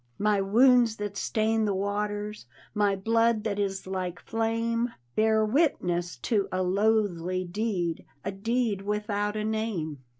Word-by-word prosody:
My 210 -1 +2
wounds 235 +3 +5
that 205 -2 -5
stain 220 +1 +1
the 200 -2 0
waters, 205 - -3 0.3
My 205 -2 +2
blood 225 +2 +2
that 205 -2 -2
is 195 -1 -2
like 185 -2 -3
flame, 230 +1 -1 0.2
Bear 220 0 +3
witness 180 - 0
to 205 -4 +1
a 185 0 0
loathly 185 -2 +1
deed, 180 -3 -2 0.2
A 200 - -1
deed 225 +1 -1
without 210 0 -1
a 215 - -1
name. 215 -9 -2
210 Hz, 135 wpm, -27 LUFS, 195-225 Hz, 0.3 s, wounds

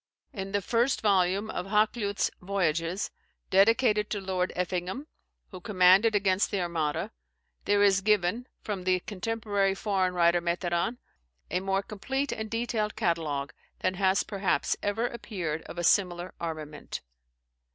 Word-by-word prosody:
In 195 -1 -5
the 200 -1 0
first 240 +6 +1
volume 200 0 +2
of 180 - -4
Hakluyt's 210 0 +1
"Voyages," 180 -1 -1 0.4
dedicated 210 +2 +4
to 205 - -2
Lord 185 -1 -1
Effingham, 180 - -2 0.5
who 185 -2 -9
commanded 195 +3 +5
against 195 -1 +2
the 200 - -1
Armada, 165 -4 -1 0.5
there 205 0 +3
is 195 -1 +4
given 210 +3 +1 0.2
(from 195 -4 -4
the 185 -1 +2
contemporary 205 -1 -1
foreign 190 -3 0
writer, 170 0 +4
Meteran) 175 +5 -1 0.5
a 180 - +1
more 195 +1 0
complete 265 +8 -3
and 220 0 -4
detailed 230 -2 -1
catalogue 145 -6 -1 0.3
than 185 - +1
has 190 +1 +2
perhaps 195 -2 0
ever 210 +3 0
appeared 190 -10 -4
of - - -9
a 175 - -2
similar 175 0 +2
armament. 155 -3 -5
195 Hz, 135 wpm, -28 LUFS, 180-210 Hz, 0.5 s, commanded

